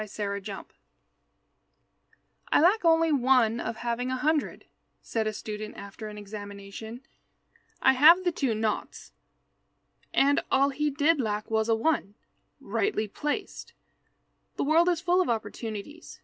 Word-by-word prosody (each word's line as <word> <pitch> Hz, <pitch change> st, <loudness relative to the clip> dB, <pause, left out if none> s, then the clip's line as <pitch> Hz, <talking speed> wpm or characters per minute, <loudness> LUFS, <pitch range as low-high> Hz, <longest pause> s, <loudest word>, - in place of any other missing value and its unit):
OPPORTUNITY 200 Hz, -1 st, -6 dB, 1.8 s
"I -, -, +5 dB
lack 370 Hz, +7 st, +4 dB
only 330 Hz, -1 st, +4 dB
one 250 Hz, -4 st, +3 dB
of 230 Hz, -, -4 dB
having 240 Hz, +2 st, -3 dB
a 260 Hz, -, -1 dB
hundred," 300 Hz, +3 st, -1 dB, 0.4 s
said 220 Hz, -1 st, -2 dB
a -, -, 0 dB
student 215 Hz, 0 st, -7 dB
after 200 Hz, +2 st, -8 dB
an 210 Hz, 0 st, -9 dB
examination; 205 Hz, +2 st, -9 dB, 0.8 s
"I 265 Hz, -, +6 dB
have 325 Hz, +8 st, +7 dB
the 355 Hz, -, +1 dB
two 270 Hz, -8 st, -1 dB
naughts." 215 Hz, -1 st, -3 dB, 1.0 s
And 280 Hz, +1 st, +3 dB
all 275 Hz, +1 st, +3 dB
he 300 Hz, +2 st, -1 dB
did 295 Hz, +1 st, +2 dB
lack 215 Hz, -1 st, -3 dB
was 220 Hz, 0 st, +1 dB
a 225 Hz, -, +4 dB
one, 225 Hz, -5 st, -1 dB, 0.4 s
rightly 395 Hz, -, -1 dB
placed. 295 Hz, -, -5 dB, 0.8 s
The -, -, -1 dB
world 330 Hz, +4 st, +4 dB
is 345 Hz, -2 st, 0 dB
full 360 Hz, +1 st, +2 dB
of 365 Hz, -, -1 dB
opportunities. 225 Hz, +6 st, -5 dB
240 Hz, 135 wpm, -27 LUFS, 215-305 Hz, 1.8 s, have